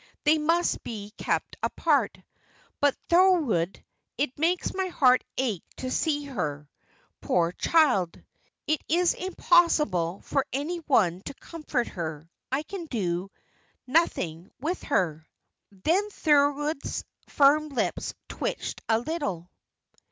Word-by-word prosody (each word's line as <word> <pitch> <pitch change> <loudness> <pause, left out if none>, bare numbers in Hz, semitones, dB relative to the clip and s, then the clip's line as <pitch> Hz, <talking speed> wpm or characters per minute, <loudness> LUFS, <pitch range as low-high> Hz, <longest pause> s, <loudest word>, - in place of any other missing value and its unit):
"They 310 +1 +4
must 335 +3 +1
be 210 -2 -7
kept - - -2
apart. - - +1 0.6
But, 285 -1 +3
Thorold, 330 - +3 0.4
it 280 +1 -2
makes 345 +3 +1
my 380 0 -1
heart 255 -8 +4
ache 230 -10 -1
to 255 0 -4
see 290 -1 0
her, 150 - -4 0.5
poor 170 -1 +1
child! 245 - +2 0.5
It 310 +1 0
is 345 +2 +3
impossible 300 - +2
for 275 - 0
any 295 +7 -2
one 200 - +2
to 280 - -6
comfort 300 -7 -3
her. 160 -3 -5 0.2
I 275 +3 0
can 350 0 -7
do 185 - -2 0.6
nothing 185 - 0
with 330 +7 -2
her." 165 - 0 0.5
Then 330 - 0
Thorold's 295 -3 +1 0.3
firm 300 +2 +4
lips 275 - -2
twitched - - -4
a 220 - +4
little. 225 - -3
280 Hz, 115 wpm, -27 LUFS, -, 0.6 s, They